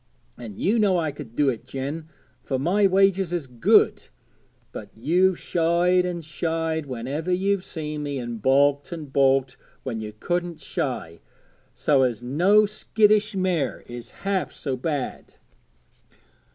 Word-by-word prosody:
And 110 -5 -9
you 225 +4 +1
know 200 -4 +3
I 160 -3 0
could 140 -5 -10
do 145 -2 +3
it, 120 -4 -3
Jen, 140 +5 -5 0.3
for 135 - -2
my 190 +9 +3
wages 195 -1 +3
is 175 -5 -2
good; 125 -3 +3 0.6
but - - -8
you've 175 +10 +2
shied 175 +2 +2
an' 175 -1 -4
shied 160 0 -2
whenever 135 +7 -3
you've 195 +1 +1
seen 150 -4 -5
me, 145 -1 -3
and 120 -3 -5
baulked 140 - +3
an' 165 -3 -5
baulked 135 -1 +2 0.3
when 120 -4 -4
you 105 -1 -6
couldn't 175 -1 -2
shy, 85 +1 -4 0.6
so 140 -3 +3
as 120 -3 0
no 180 +12 +4
skittish 215 0 +2
mare 175 - -1
is 120 -1 -9 0.2
half 195 -2 0
so 135 -3 -4
bad.' 140 0 -4
155 Hz, 140 wpm, -24 LUFS, 130-180 Hz, 0.6 s, no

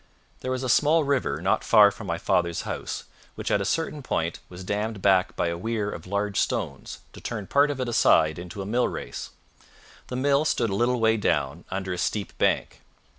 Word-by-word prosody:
There 130 - -5
was 130 0 -2
a - - -1
small 150 +5 +4
river 140 -2 0
not - - +2
far 105 -2 +7
from 100 0 -9
my 85 -1 -1
father's 85 0 0
house, - - -5 0.3
which - - -4
at 100 - +2
a - - -2
certain 155 +3 -1
point 85 -10 -2
was 90 +1 -9
dammed 105 +2 -2
back 95 -1 +3
by 85 - 0
a 85 - -3
weir 110 0 -2
of 85 - -8
large 100 +1 -1
stones - - -3
to - - -12
turn 105 -4 -4
part 140 +7 +3
of 145 -2 -3
it 130 - -1
aside 80 -8 +3
into 90 +3 -6
a - - -8
mill 120 +5 +1
race. - - -6 0.8
The 125 - -5
mill 140 +3 +2
stood 115 -7 0
a - - -1
little 120 +3 +1
way 110 0 +3
down, 75 -5 -1
under 95 -1 -3
a 90 - -4
steep 105 +1 -2
bank. - - 0
105 Hz, 210 wpm, -26 LUFS, 90-125 Hz, 0.8 s, far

